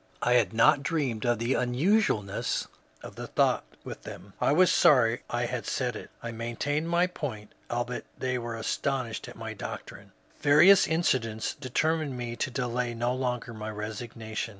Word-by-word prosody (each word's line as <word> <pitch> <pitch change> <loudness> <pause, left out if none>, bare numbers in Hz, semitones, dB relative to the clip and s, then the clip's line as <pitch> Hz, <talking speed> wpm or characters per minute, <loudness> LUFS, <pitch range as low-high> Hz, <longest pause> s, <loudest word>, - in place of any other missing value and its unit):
I 120 - +3
had 125 - +3
not 115 +5 +5
dreamed 135 -7 -1
of 120 0 +3
the 120 +4 0
unusualness 125 - +1 0.4
of - - -8
the - - -5
thought - - +2 0.2
with - - -8
them. 100 +1 -10
I - - +3
was 180 +4 +5
sorry 120 -4 +5
I 120 0 0
had 120 0 -4
said 125 -3 -1
it. - - -8
I 115 - -4
maintained 120 +8 -2
my 170 +1 +3
point, 130 -12 -6 0.2
albeit 120 +1 -3
they 130 -1 -1
were 120 -1 -4
astonished 120 +1 -2
at - - -11
my - - -6
doctrine." - - -8 0.3
Various 155 +7 +7
incidents 125 -9 0
determined 145 +1 -1
me 120 -1 -4
to - - -2
delay 125 -1 -2
no 120 +2 0
longer 125 -2 -2
my 110 0 -6
resignation. 110 +1 -5
125 Hz, 165 wpm, -28 LUFS, 115-140 Hz, 0.4 s, Various